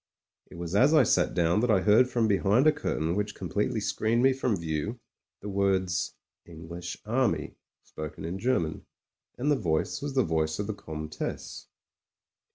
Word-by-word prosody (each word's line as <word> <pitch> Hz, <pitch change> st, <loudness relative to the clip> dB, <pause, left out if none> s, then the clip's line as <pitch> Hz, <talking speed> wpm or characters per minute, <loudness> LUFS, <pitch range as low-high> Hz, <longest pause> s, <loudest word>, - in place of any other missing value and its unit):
It -, -, -12 dB
was 85 Hz, 0 st, -5 dB
as 135 Hz, +9 st, +5 dB
I 150 Hz, -, +7 dB
sat -, -, +2 dB
down 85 Hz, +3 st, +2 dB
that 120 Hz, +2 st, +1 dB
I 100 Hz, -4 st, +4 dB
heard 110 Hz, +6 st, +5 dB
from 120 Hz, -3 st, +1 dB
behind 105 Hz, +5 st, +3 dB
a 155 Hz, -, +7 dB
curtain 85 Hz, -, -2 dB
which 105 Hz, 0 st, -2 dB
completely -, -, -1 dB
screened 115 Hz, +2 st, 0 dB
me 135 Hz, 0 st, +5 dB
from 130 Hz, -4 st, 0 dB
view, 85 Hz, +8 st, -3 dB, 0.4 s
the 105 Hz, -, -7 dB
words 95 Hz, -2 st, 0 dB, 0.3 s
"English 85 Hz, +2 st, -8 dB
Army" 110 Hz, -, 0 dB, 0.3 s
spoken 75 Hz, 0 st, -7 dB
in 90 Hz, +4 st, -4 dB
German. 95 Hz, -10 st, -1 dB, 0.5 s
And 145 Hz, +4 st, +1 dB
the -, -, +4 dB
voice 90 Hz, -, -1 dB
was 140 Hz, -1 st, -4 dB
the 130 Hz, -, +4 dB
voice 80 Hz, -2 st, 0 dB
of 105 Hz, -, -2 dB
the 110 Hz, -, -3 dB
Comtesse. 75 Hz, -4 st, -6 dB
100 Hz, 165 wpm, -28 LUFS, 85-120 Hz, 0.5 s, I